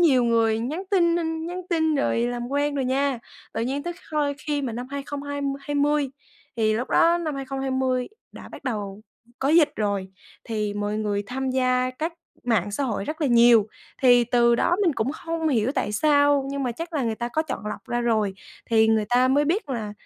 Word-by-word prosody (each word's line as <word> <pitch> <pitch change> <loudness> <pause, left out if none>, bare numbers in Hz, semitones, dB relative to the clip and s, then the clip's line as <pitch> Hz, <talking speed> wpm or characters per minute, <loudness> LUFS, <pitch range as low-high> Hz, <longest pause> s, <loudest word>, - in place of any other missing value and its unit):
nhiều 265 -8 +5
người 225 -1 +2
nhắn 305 +10 -3
tin 340 -4 +3 0.3
nhắn 360 +1 -5
tin 320 -2 +2
rồi 275 -4 +1
làm 240 0 -2
quen 285 +1 0
rồi 270 -2 -1
nha. 270 0 0 0.4
Tự - - -1
nhiên 270 +4 -2
tới 345 +2 -3 0.2
hôi 290 -2 +1
khi 295 -1 -2
mà 250 -4 -3
năm 245 +2 -5
hai 280 0 -4
không 285 0 -6
hai 285 0 -4 0.2
hai 290 +1 -5
mươi 290 -1 +2 0.5
thì 215 -1 +2
lúc 245 +3 -3
đó 340 +1 +4
năm 310 -4 -3
2020 265 -2 -1 0.2
đã - - -11
bắt - - -12
đầu 205 -5 -4 0.4
có 270 - 0
dịch 310 -2 +5
rồi, 200 -3 -1 0.4
thì 210 -3 -2
mọi 205 0 -2
người 205 -1 -1
tham 265 +2 -3
gia 255 -1 +1
các 320 +2 -2 0.3
mạng 210 -5 +1
xã 275 +7 -1
hội 215 -5 -2
rất 310 +6 -5
là 295 - +2
nhiều. 235 -3 +6 0.4
Thì 245 -2 +6
từ 235 0 +3
đó 350 - +2
mình 340 -5 +3
cũng 245 +5 -1
không 330 -1 -3
hiểu 240 -2 +1
tại 210 - -1
sao 285 +2 +3
nhưng 280 0 -3
mà 245 - -1
chắc 335 +8 -7
là 290 - 0
người 225 -2 -1
ta 235 +2 -4
có 310 +6 0
chọn 260 -8 -5
lọc 210 - -6
ra 240 0 0
rồi, 220 -5 +1 0.3
thì 220 -1 +4
người 220 -1 +3
ta 250 +1 +4
mới 285 +3 +3
biết 330 +1 0
là, 220 -4 -3
260 Hz, 215 wpm, -24 LUFS, 230-290 Hz, 0.5 s, nhiều